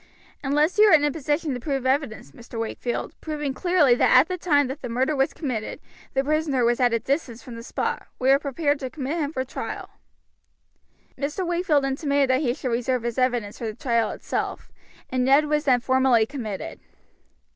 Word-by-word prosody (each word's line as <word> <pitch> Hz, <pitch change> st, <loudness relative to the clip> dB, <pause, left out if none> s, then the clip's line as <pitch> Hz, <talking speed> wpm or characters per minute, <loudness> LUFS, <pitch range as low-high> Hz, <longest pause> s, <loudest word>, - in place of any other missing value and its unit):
"Unless 295 Hz, +7 st, +1 dB
you 425 Hz, -, +8 dB
are 410 Hz, -, +6 dB
in 295 Hz, -, +3 dB
a 295 Hz, -, +2 dB
position 295 Hz, 0 st, -1 dB
to 250 Hz, -, -4 dB
produce 270 Hz, 0 st, -3 dB
evidence, 260 Hz, -, -1 dB
Mr. 230 Hz, -, -9 dB
Wakefield, 230 Hz, +1 st, -3 dB
proving 300 Hz, -3 st, -3 dB
clearly 350 Hz, -5 st, +3 dB
that 245 Hz, -, +5 dB
at 265 Hz, +5 st, +6 dB
the 365 Hz, -, -2 dB
time 295 Hz, -5 st, +2 dB
the 265 Hz, -1 st, -6 dB
murder 260 Hz, +6 st, 0 dB
was 270 Hz, 0 st, +1 dB
committed 250 Hz, -9 st, -4 dB, 0.4 s
the 270 Hz, -, +2 dB
prisoner 295 Hz, -4 st, +1 dB
was 240 Hz, 0 st, +2 dB
at 245 Hz, -1 st, +3 dB
a 230 Hz, -, +2 dB
distance 245 Hz, -1 st, -3 dB
from 245 Hz, -, -9 dB
the 230 Hz, -, -8 dB
spot, 235 Hz, -, -3 dB
we 260 Hz, +1 st, +3 dB
are 275 Hz, -, +5 dB
prepared 285 Hz, 0 st, -1 dB
to 260 Hz, -, -4 dB
commit 290 Hz, +4 st, -3 dB
him 290 Hz, -2 st, -1 dB
for 260 Hz, -4 st, -2 dB
trial." -, -, -6 dB, 1.3 s
Mr. 295 Hz, +6 st, -2 dB
Wakefield 340 Hz, -5 st, +1 dB
intimated 280 Hz, 0 st, +1 dB
that 260 Hz, +2 st, +2 dB
he 245 Hz, -4 st, 0 dB
should 255 Hz, -, -3 dB
reserve 245 Hz, +1 st, 0 dB
his 235 Hz, +1 st, -2 dB
evidence 245 Hz, -5 st, 0 dB
for 235 Hz, -, -4 dB
the 215 Hz, -, -5 dB
trial 235 Hz, -5 st, 0 dB
itself, -, -, -4 dB, 0.4 s
and 255 Hz, -1 st, +1 dB
Ned 275 Hz, +4 st, +5 dB
was 300 Hz, 0 st, 0 dB
then 255 Hz, -3 st, +4 dB
formally 260 Hz, -2 st, +3 dB
committed. 220 Hz, -7 st, -6 dB
270 Hz, 195 wpm, -24 LUFS, 245-295 Hz, 1.3 s, you